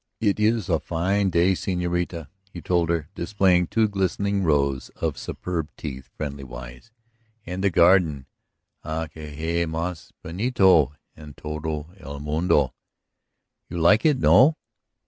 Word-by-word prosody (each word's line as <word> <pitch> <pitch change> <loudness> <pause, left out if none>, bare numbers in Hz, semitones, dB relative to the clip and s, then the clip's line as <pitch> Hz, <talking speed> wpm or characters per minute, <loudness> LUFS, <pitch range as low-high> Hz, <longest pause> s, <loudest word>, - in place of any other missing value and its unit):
"It 105 -2 +1
is 110 -2 +2
a 85 -4 +1
fine 95 +5 0
day, 85 +2 +3
señorita," 90 -3 -2 0.2
he 90 - -8
told 85 -1 0
her, 85 -3 -1
displaying 90 -2 +2
two 110 +3 +2
glistening 100 0 -1
rows 70 -5 +1
of - - -2
superb 85 -4 -4
teeth 65 -4 -7
friendliwise. 65 - -7 0.6
"And 90 +2 -4
the 100 - +4
garden... 85 -6 +4 0.6
Ah, 80 +1 -3
que 80 -1 -10
hay 80 +3 -2
más 80 +1 -4
bonito 90 - +3 0.2
en 75 -2 -12
todo 75 +1 -5
el 70 -5 -8
mundo? 75 -2 +1 1.0
You 85 - -5
like 85 +7 +4
it, 150 -4 +3
no?" 140 +4 +5
85 Hz, 130 wpm, -24 LUFS, 75-95 Hz, 1.0 s, no